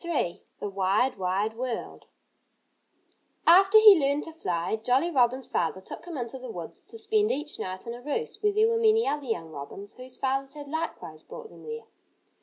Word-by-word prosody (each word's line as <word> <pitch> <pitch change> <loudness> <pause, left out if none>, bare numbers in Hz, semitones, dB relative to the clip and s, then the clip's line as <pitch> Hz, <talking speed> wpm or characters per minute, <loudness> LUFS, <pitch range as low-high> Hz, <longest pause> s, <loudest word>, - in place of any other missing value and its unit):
III 315 - -1 0.2
THE - - -3
WIDE, 200 +5 +1
WIDE 195 +4 0
WORLD 245 -1 -5 1.4
After 390 +5 +7
he 425 -4 +9
learned 280 +1 +1
to 325 - -8
fly, 180 - -2
Jolly 255 +9 +1
Robin's 255 -2 +2
father 170 +2 -1
took 190 - -10
him 340 -4 -6
into 245 +1 -5
the 255 -1 -8
woods 175 -7 -7
to 455 - -10
spend 430 -1 +1
each 295 +2 -2
night 185 0 -5
in 235 - -5
a 240 - -9
roost 375 - -4
where 420 -1 +3
there 430 +2 +3
were 460 0 +1
many 450 0 +4
other 285 -1 -2
young 165 -8 -3
robins, 155 +8 -8
whose 255 0 -13
fathers 270 +1 -1
had 290 -1 -8
likewise 320 +3 -5
brought 475 -2 -10
them - - -14
there. 460 0 -6
270 Hz, 190 wpm, -27 LUFS, 220-365 Hz, 1.4 s, he